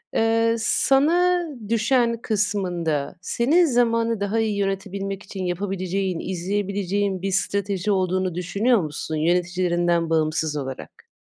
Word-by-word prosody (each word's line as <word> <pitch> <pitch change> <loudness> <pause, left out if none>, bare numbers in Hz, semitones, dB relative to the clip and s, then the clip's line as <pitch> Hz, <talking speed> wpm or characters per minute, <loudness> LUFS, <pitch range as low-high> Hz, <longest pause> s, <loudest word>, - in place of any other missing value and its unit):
eee, 230 0 +2
sana 345 +10 +3 0.2
düşen 235 0 +2
kısmında 180 -8 -1
senin 295 - +3
zamanı 230 -4 +1
daha 200 +3 0
iyi 215 -2 0
yönetebilmek 195 0 -3
için 190 -1 -6
yapabileceğin, 185 0 -2
izleyebileceğin 195 +1 -2
bir 195 0 -2
strateji 200 +1 -1
olduğunu 185 -2 0
düşünüyor 205 +6 +1
musun 155 0 -4
yöneticilerinden 175 0 +1
bağımsız 155 -1 0
olarak? 135 -2 -7
195 Hz, 105 wpm, -23 LUFS, 175-225 Hz, 0.2 s, sana